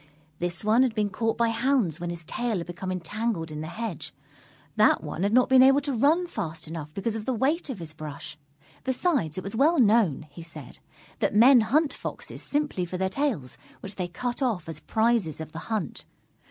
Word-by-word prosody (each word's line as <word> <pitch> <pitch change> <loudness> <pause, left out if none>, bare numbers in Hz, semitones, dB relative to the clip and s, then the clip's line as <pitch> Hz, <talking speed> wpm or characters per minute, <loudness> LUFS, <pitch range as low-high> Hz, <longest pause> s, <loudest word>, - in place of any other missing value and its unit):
This 175 +1 -3
one 220 +4 +4
had 255 -4 +2
been 210 -2 0
caught 225 +3 -1
by 235 -1 +2
hounds 230 - +1
when 175 0 -4
his 170 -1 -6
tail 235 +4 -2
had 170 - -4
become 180 +2 -5
entangled 185 -1 -3
in 150 0 -5
the 155 - -5
hedge. 215 -2 -6 0.6
That - - +4
one - - -5
had 200 +1 +2
not 250 +2 +5
been 260 -1 +6
able 270 +2 +7
to 285 -1 -2
run 300 +9 +3
fast 165 - -5
enough 155 -2 -6
because 215 +3 -2
of 220 -1 -5
the 260 - +1
weight 290 +7 0
of 260 - -4
his 165 -3 -7
brush. 150 -1 -8 0.5
Besides, 260 - 0
it 185 - -3
was 195 +3 -5
well 300 +6 +4
known, 210 - +3
he 170 - -10
said, 160 -5 -10 0.4
that - - 0
men 245 +3 +8
hunt 285 +7 +2
Foxes - - -7
simply 290 -10 -1
for 180 +1 -4
their 190 +1 0
tails, 215 - -2 0.2
which 195 - -7
they 180 -2 -2
cut 245 +8 -4
off 230 -11 0
as 165 - -4
prizes 220 -8 +1
of 160 -1 -7
the 160 - -7
hunt. 215 -6 -3
215 Hz, 205 wpm, -26 LUFS, 170-250 Hz, 0.6 s, men